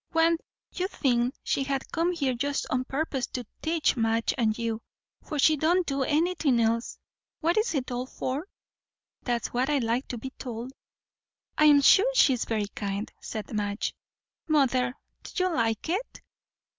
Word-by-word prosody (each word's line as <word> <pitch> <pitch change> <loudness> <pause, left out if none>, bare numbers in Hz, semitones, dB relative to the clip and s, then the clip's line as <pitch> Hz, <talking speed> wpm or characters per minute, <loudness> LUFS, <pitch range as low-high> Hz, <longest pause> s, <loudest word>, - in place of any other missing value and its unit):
One 330 0 +4 0.4
'ud 370 - 0
think 245 -5 +1
she 275 - 0
had 270 0 -3
come 335 +1 +1
here 280 -7 0
just 280 +3 -1
on 255 0 0
purpose 270 -2 -2
to 250 -2 -5 0.2
teach 320 -2 +1
Madge 225 -1 +1
and 220 -4 +1
you; 230 -1 -2 0.4
for 305 - -5
she 310 +2 +5
don't 345 +5 +2
do 275 -2 -1
anything 305 -2 +2
else. 230 +1 0 0.4
What's 345 +4 +1
it 260 -2 -2
all 245 +1 -3
for? 270 +7 -4 0.7
that's 240 -2 -1
what 255 +3 +1
I'd 285 -4 +2
like 235 +4 0
to 245 - -4
be 265 +4 -6
told." 245 +1 -6 0.8
"I'm 295 -2 +6
sure 405 - +6
she's 260 - +4
very 215 -2 -1
kind," 200 +1 -4
said 215 +1 -6
Madge. 205 0 -1 0.5
"Mother, 260 -4 +2 0.3
do 370 - -3
you 370 -2 +1
like 225 -3 0
it?" 385 +9 -3
265 Hz, 155 wpm, -27 LUFS, 235-315 Hz, 0.8 s, I'm